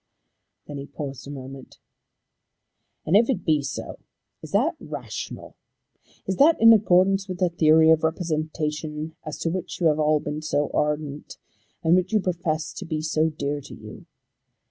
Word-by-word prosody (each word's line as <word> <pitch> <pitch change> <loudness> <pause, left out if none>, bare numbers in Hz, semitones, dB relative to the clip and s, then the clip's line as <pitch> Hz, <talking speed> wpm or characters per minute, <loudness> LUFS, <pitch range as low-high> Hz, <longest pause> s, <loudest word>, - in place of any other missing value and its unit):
Then 145 -1 -7
he 140 - -7
paused 140 -4 -7
a - - -8
moment. 135 -1 -9 1.3
"And 165 - +2
if 225 +4 +5
it 190 -10 -1
be 155 -3 +3
so, 135 -2 -6 0.4
is - - -9
that - - +1
rational? - - -7 0.7
Is 190 - -2
that 310 +4 +5
in 230 0 +8
accordance 195 -1 +3
with 185 -1 -5
the 180 0 +2
theory 160 -1 +5
of 160 0 +3
representation 155 -1 -3
as 155 -2 -6
to 165 - 0
which 185 0 -5
you 175 - 0
have 155 0 0
all 155 0 +3
been 150 +1 -5
so 150 -2 -1
ardent, 150 -1 -2 0.5
and 165 +2 +4
which 185 0 +1
you 215 - +4
profess 170 -4 -2
to - - -7
be 155 -2 -3
so 155 0 +1
dear 145 -1 -3
to - - -11
you? - - -12
155 Hz, 165 wpm, -24 LUFS, 150-180 Hz, 1.3 s, in